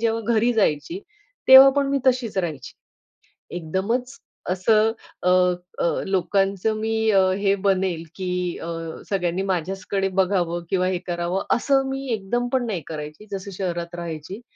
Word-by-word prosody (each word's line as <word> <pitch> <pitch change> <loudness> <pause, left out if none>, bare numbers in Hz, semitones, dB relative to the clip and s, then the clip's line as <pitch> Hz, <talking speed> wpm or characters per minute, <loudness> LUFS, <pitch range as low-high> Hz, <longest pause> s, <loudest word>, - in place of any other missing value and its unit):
जेव्हा 230 0 0
घरी 235 +3 +3
जायची, 220 - 0 0.5
तेव्हा 265 +1 +11
पण 280 -1 +2
मी 275 - +2
तशीच 250 -5 +1
राहायची. 155 -7 -4 0.8
एकदमच 200 - -2 0.3
असं 215 +4 +3 0.3
अ, 180 - +3 0.5
अ, - - +1 0.2
लोकांचं 195 +2 +1
मी 220 0 0
अ, 195 -2 +5 0.2
हे 200 -1 +2
बनेल 185 -4 +1
की 185 -2 -4 0.3
अ, 165 - -5 0.4
सगळ्यांनी 180 -2 -1
माझ्याचकडे 190 +1 -2
बघावं 175 -3 +1
किंवा 185 -1 +1
हे 185 - 0
करावं 175 +2 -2
असं 270 +2 +1
मी 270 0 -4
एकदमपण 240 +5 -1
नाही 195 -7 -3
करायची, 150 +4 -7
जसं 195 0 -5
शहरात 175 -2 -3
राहायची. 170 +4 -6
195 Hz, 135 wpm, -23 LUFS, 175-225 Hz, 0.8 s, तेव्हा